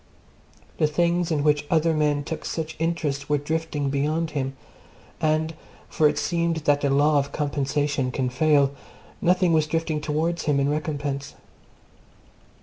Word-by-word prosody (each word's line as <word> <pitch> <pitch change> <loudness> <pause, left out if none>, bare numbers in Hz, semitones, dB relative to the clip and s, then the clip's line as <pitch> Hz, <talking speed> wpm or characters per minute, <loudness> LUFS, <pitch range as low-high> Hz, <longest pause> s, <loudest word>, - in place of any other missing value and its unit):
The 155 - +4
things 170 +2 +1
in 150 -3 0
which 150 -1 +2
other 165 0 +3
men 150 -2 +1
took 160 - -5
such 160 0 -4
interest 160 -4 -2
were 150 - +3
drifting 150 -1 -2
beyond 155 +3 0
him, 135 -2 -3 0.6
and 155 +1 +1 0.4
(for 155 -1 +3
it 150 - -3
seemed 170 +1 0
that 145 0 +3
the 140 - +1
law 145 +2 +4
of 140 0 -3
compensation 145 -1 -1
can 130 -1 -1
fail) 140 0 +3 0.5
nothing 180 -1 +3
was 155 -1 +3
drifting 160 -1 -1
towards 160 +3 -1
him 145 -2 +2
in 140 +1 +1
recompense. 145 -2 -3
150 Hz, 145 wpm, -24 LUFS, 145-160 Hz, 0.6 s, The